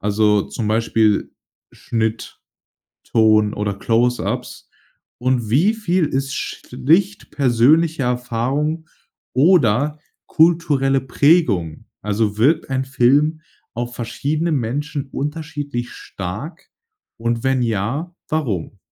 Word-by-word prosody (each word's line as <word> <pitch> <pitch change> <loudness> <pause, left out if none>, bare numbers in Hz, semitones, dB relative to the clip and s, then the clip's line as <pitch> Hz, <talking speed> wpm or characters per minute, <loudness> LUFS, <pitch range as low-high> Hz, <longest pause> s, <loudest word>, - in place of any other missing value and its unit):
also 105 0 +2
zum 115 - -5
Beispiel 110 -1 +1 0.4
Schnitt, 115 -3 -3 0.6
Ton 110 -2 +3
oder 100 -1 -2
Close-Ups? 120 +4 -1 0.5
Und 125 -3 0
wie 175 - +3
viel 185 -6 0
ist 135 -1 -2
schlicht 165 +11 -1
persönliche 145 +5 +3
Erfahrung 125 +6 -1 0.5
oder 145 - +3 0.3
kulturelle 150 -5 +2
Prägung? 130 - +2 0.2
Also 105 0 -1
wirkt 150 +8 +2
ein 130 0 0
Film 140 +5 +2 0.3
auf 120 +1 -4
verschiedene 145 +8 -2
Menschen 140 +2 -2
unterschiedlich 145 -4 -4
stark? 115 - -7 0.5
Und 115 0 -2
wenn 130 -1 +2
ja, 120 - -2
warum? 110 - -2
130 Hz, 95 wpm, -20 LUFS, 115-150 Hz, 0.6 s, Ton